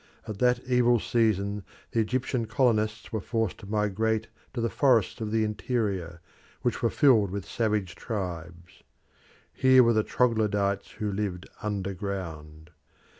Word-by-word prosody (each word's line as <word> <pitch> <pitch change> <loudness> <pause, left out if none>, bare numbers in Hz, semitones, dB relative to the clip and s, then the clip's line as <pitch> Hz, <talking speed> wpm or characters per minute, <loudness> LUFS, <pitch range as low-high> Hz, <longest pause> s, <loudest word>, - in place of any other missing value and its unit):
At 105 -2 -6
that 125 0 +3
evil 120 -1 +4
season 105 -3 0 0.3
the 115 - 0
Egyptian 120 +1 -1
colonists 110 -2 0
were 110 - -1
forced 115 -1 -2
to 100 - -11
migrate 110 +1 0 0.3
to - - -2
the 115 - +1
forests 120 -3 +2
of 110 - -2
the 110 0 +1
interior, 100 -5 -2 0.4
which 120 -3 0
were 115 - +2
filled 115 -9 +4
with 100 0 -4
savage 105 -6 -1
tribes. 90 -3 -6 0.7
Here 130 -1 +6
were 115 0 +4
the 110 - +3
Troglodytes 105 -4 0
who 105 -1 -3
lived 95 -3 -3
under 100 -2 -2
ground. 80 -6 -6
105 Hz, 140 wpm, -27 LUFS, 95-115 Hz, 0.7 s, Here